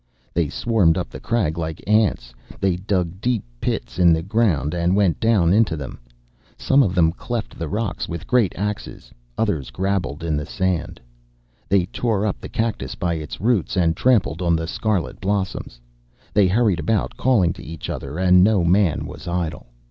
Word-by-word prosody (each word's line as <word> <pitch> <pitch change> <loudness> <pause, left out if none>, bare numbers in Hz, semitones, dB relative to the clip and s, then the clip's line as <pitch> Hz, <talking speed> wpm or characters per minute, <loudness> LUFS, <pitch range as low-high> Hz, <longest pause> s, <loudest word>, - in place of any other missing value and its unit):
They 85 -4 +1
swarmed 100 -7 +2
up 90 - -3
the - - -9
crag 90 -9 -1
like 80 -1 -4
ants. 105 - +2 0.3
They 95 -2 +1
dug 90 -1 -2
deep 120 -3 0 0.2
pits - - -3
in 85 -2 +6
the 80 0 0
ground 95 - +1
and 85 +1 +1
went 100 -5 +2
down 100 -7 +3
into 105 -6 +3
them. 70 -3 -7 0.6
Some 135 +1 +3
of 95 -8 +1
them 80 -3 +4
cleft 115 +4 -5
the 80 -2 -3
rocks 105 0 -3
with 85 -1 -5
great 120 -7 +2
axes; 100 -10 -5 0.3
others 90 - -1
grabbled 90 -6 -2
in 80 -2 0
the 75 0 -2
sand. 95 -1 -2 0.7
They 95 -2 +3
tore 105 +1 -1
up 105 - -2
the - - -7
cactus 110 -1 -2
by 90 -3 -1
its 80 -2 -6
roots, 105 -4 +1
and 85 -2 +2
trampled 95 - +2
on 85 -2 +2
the 80 0 -2
scarlet 100 +1 -2
blossoms. 95 -10 -2 0.5
They 100 -2 +5
hurried 100 -2 +2
about, 100 +7 0
calling 110 -10 +2
to - - -11
each 80 +1 -7
other, 70 +3 -5
and 90 0 +5
no 100 -3 +3
man 90 -1 +2
was - - -9
idle. 85 -6 -3
90 Hz, 180 wpm, -22 LUFS, 80-105 Hz, 0.7 s, in